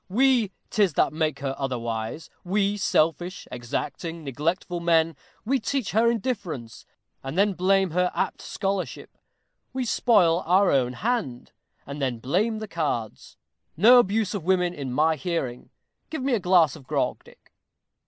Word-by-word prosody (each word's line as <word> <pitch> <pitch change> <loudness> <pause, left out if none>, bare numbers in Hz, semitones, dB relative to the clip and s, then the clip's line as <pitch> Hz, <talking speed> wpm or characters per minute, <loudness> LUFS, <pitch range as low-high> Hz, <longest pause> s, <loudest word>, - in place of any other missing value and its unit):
We 240 -1 +3 0.2
'tis 200 -6 +2
that - - +2
make 155 -2 -1
her 135 -1 -2
otherwise; 120 0 -4
we, 200 +2 +1
selfish, 175 -1 0
exacting, 150 +7 -4
neglectful 165 +6 -2
men; 165 -1 +2 0.3
we 265 +4 +1
teach 245 +1 -2
her 225 +2 +3
indifference, 190 - -4 0.4
and 135 +5 -5
then 200 +1 +3
blame 190 0 +2
her 180 +2 +1
apt - - -2
scholarship. 195 -2 -4 0.6
We 260 -1 -2
spoil 185 -8 +3
our 190 +3 +4
own 125 -2 +2
hand, 205 - -2 0.3
and 140 +1 -7
then 130 -3 -1
blame 195 - 0
the 215 0 -6
cards. 145 - -4 0.4
No 240 +8 +8
abuse 215 -2 +1
of 200 -5 -4
women 180 0 +1
in 140 -6 -5
my 155 +4 +2
hearing. 135 -6 -3 0.4
Give 315 -5 -4
me 270 -1 +1
a 230 - +2
glass 180 -6 +4
of 130 - -14
grog, - - -1
Dick. - - -21
180 Hz, 150 wpm, -25 LUFS, 145-205 Hz, 0.6 s, No